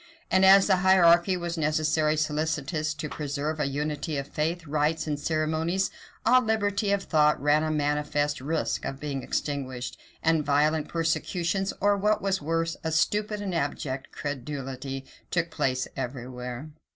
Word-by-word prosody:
And 190 0 +4
as 195 +1 +8
the 190 -2 +4
hierarchy 180 -1 +5
was 170 -1 -4
necessarily 155 0 +1
solicitous 155 0 -1
to 155 - -4
preserve 150 +1 -3
a 150 - +1
unity 150 +2 -2
of 140 - -2
faith, 165 +4 -2
rites, 155 +2 0
and 150 -2 -2
ceremonies, 160 +4 0 0.3
all 255 0 +6
liberty 205 -2 0
of 200 -1 +1
thought 150 -3 +3
ran 150 +2 +3
a 155 - -1
manifest 150 -1 0
risk 155 +4 -1
of 135 - -4
being 140 -2 -3
extinguished; 130 -3 -3 0.2
and 160 -1 +3
violent 150 +2 +2
persecutions, 170 +3 -1
or, 205 +1 +3
what 210 +2 +2
was 195 -2 -1
worse, 165 +2 -1
a 160 - -1
stupid 210 +6 0
and 190 -3 -3
abject 140 -4 -3
credulity, 135 -1 -5 0.2
took 170 -1 -1
place 130 -3 0
every 125 -2 -4
where. 125 +3 -6
155 Hz, 150 wpm, -27 LUFS, 145-170 Hz, 0.3 s, as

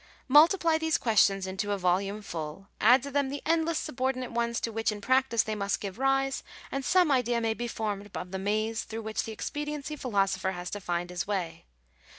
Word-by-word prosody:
Multiply 320 +3 +5
these 320 -1 +1
questions 200 -4 +3
into 190 +2 -3
a - - -1
volume 195 +3 0
full; 165 +2 -6
add 245 +4 +6
to 280 - -6
them 280 -1 +1
the 285 +1 -5
endless 330 0 +2
subordinate 255 -2 -2
ones 235 0 0
to 230 - -2
which 225 0 0
in 210 - -6
practice 255 0 +2
they 220 - -3
must 200 -1 -1
give 200 +2 -6
rise; 270 0 +1 0.3
and 275 0 -2
some 355 +3 +4
idea 245 -3 +2
may 225 -1 0
be 240 +2 -4
formed 210 -3 -4
of 180 0 -6
the 190 - -3
maze 215 +3 0
through 225 0 -6
which 220 0 -2
the 225 - -5
expediency 295 +5 -4
philosopher 195 -7 0
has 175 0 -6
to 205 - -5
find 175 -1 -2
his 180 +1 -3
way. 185 - -3
225 Hz, 200 wpm, -29 LUFS, 195-270 Hz, 0.3 s, add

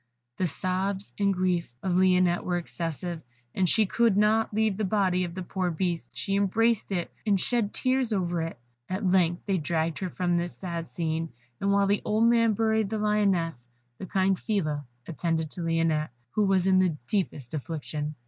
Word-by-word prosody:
The 185 - +1
sobs 190 +4 -2
and 200 -1 +3
grief 180 -2 0
of 190 - 0
Lionette 180 -1 +3
were 175 -1 0
excessive, 170 0 -4 0.4
she 215 +5 +3
could 225 0 +2
not 215 +2 +3
leave 215 -1 +1
the 215 - -1
body 185 -2 +1
of 170 -1 -7
the 185 - -4
poor 185 0 -2
beast, 170 0 -3
she 195 - -1
embraced 215 +3 +2
it, 175 -3 -2
and 205 -3 +2
shed 230 0 0
tears 255 -2 0
over 175 -4 0
it. 165 0 -4 0.3
At 190 +2 -2
length 180 -2 +2
they 195 -3 +1
dragged 160 +1 -1
her 185 - -2
from 175 -1 0
this 170 0 -3
sad 170 -3 -4
scene, 165 -1 -2 0.3
and 200 - +1
while 200 0 +4
the 200 +1 +1
old 215 +2 +1
man 230 -1 +4
buried 220 -1 +1
the 220 - -2
Lioness, 205 -6 +2 0.5
the 190 - -6
kind 190 0 +1
Phila 155 - -1 0.2
attended 165 -1 -1
to 180 - -7
Lionette, 165 -2 +1 0.2
who 210 +7 +2
was 190 -2 +2
in 190 -1 +4
the 180 -5 +2
deepest 150 - -2
affliction. 150 0 -4
185 Hz, 180 wpm, -27 LUFS, 170-205 Hz, 0.5 s, while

